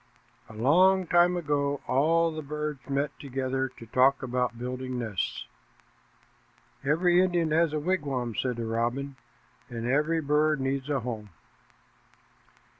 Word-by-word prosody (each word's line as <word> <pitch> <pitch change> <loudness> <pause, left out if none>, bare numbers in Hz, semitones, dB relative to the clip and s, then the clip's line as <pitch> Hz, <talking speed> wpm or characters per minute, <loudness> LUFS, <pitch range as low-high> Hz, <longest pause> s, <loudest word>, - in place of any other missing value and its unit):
A - - -11
long 180 - +4
time 175 +1 +4
ago 145 -3 0
all 165 +5 +2
the 155 0 -5
birds 150 -2 -5
met 140 +1 0
together 130 -1 -2
to 115 - -10
talk 130 +4 +3
about 125 -1 -1
building 125 +1 -4
nests. 110 -6 -3 1.4
"Every 175 +5 +3
Indian 175 -4 +1
has 165 0 +3
a 155 - -1
wigwam," 145 -8 -1
said 125 +2 -1
the 115 0 -4
robin, 120 +5 -2 0.5
"and 115 -1 -5
every 150 +6 +1
bird 150 0 +2
needs 135 +1 -2
a 140 -3 0
home." 110 -3 -5
140 Hz, 130 wpm, -28 LUFS, 125-155 Hz, 1.4 s, long